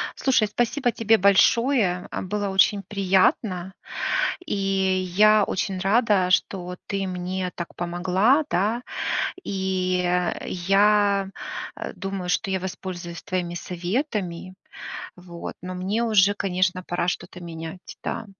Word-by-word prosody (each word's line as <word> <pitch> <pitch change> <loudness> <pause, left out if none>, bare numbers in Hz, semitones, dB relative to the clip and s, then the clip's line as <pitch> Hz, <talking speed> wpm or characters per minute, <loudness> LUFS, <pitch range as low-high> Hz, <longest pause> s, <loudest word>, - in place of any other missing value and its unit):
Слушай, 250 -5 +2
спасибо 240 +4 0
тебе 225 -1 +3
большое, 200 -1 +3
а, - - -3
было 205 +1 -2
очень 195 +1 +3
приятно, 190 -1 +1 0.7
и - - -1
я 195 +1 +3
очень 190 0 -2
рада, 200 -1 +3
что 185 +1 +1
вот 180 0 -7
ты 195 -1 -2
мне 180 0 -3
так 170 - -6
помогла, 185 - +2
да, 210 +7 +1 0.6
и 185 -2 0 0.4
я, 200 +2 +3 0.5
э, - - -6
думаю, 195 -2 -4
что 185 - 0
я 190 - 0
воспользуюсь 180 -2 -6
твоими 175 -2 -2
советами, 185 - -3 0.6
вот, 175 -1 -8
но 180 +1 -6
мне 195 +6 -1
уже, 205 -3 +4
конечно, 185 -2 0
пора 175 0 -2
что-то 180 0 -4
менять, 165 +1 -8
да. 225 - -3
190 Hz, 120 wpm, -24 LUFS, 180-205 Hz, 0.7 s, уже